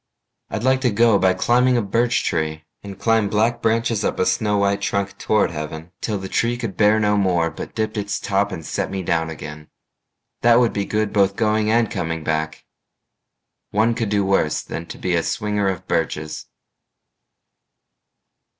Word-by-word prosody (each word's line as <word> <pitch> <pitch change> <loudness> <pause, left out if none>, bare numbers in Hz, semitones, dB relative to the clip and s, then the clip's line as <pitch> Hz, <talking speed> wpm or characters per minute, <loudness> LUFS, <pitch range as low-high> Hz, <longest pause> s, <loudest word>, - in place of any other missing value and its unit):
I'd 110 - -4
like 130 0 +3
to 125 - +2
go 115 -1 +4
by 95 -1 +3
climbing 125 +5 +3
a - - +2
birch 115 +4 +1
tree, 80 0 -2 0.2
And 100 -1 -9
climb 115 -3 +2
black 115 +3 +1
branches 115 -1 +1
up - - -1
a - - +1
snow 105 0 +1
white 100 0 +1
trunk 100 0 -1
Toward 110 -4 +2
heaven, 80 +1 -6
till 105 -2 -1
the 95 0 -6
tree 120 +5 0
could 115 -6 -5
bear 105 +1 +4
no 105 -1 +2
more, 90 -4 +1
But - - -8
dipped 110 0 -2
its 100 0 -2
top 100 +1 0
and 80 -4 -6
set - - -2
me 95 -1 -4
down 80 -1 0
again. 75 -1 -9 0.7
That 120 0 +5
would 120 -2 +2
be 100 -1 -1
good 110 0 -1
both 100 -1 +3
going 110 -1 +1
and 115 +1 +2
coming 85 -6 -3
back. 80 0 -2 1.0
One 110 +3 +2
could 115 -2 -2
do 100 -1 +1
worse 95 -6 +1
than 85 - -6
be 90 +1 -3
a 85 - +2
swinger 105 +1 -1
of 95 -3 -5
birches. 75 -1 -2
100 Hz, 175 wpm, -21 LUFS, 90-110 Hz, 1.0 s, That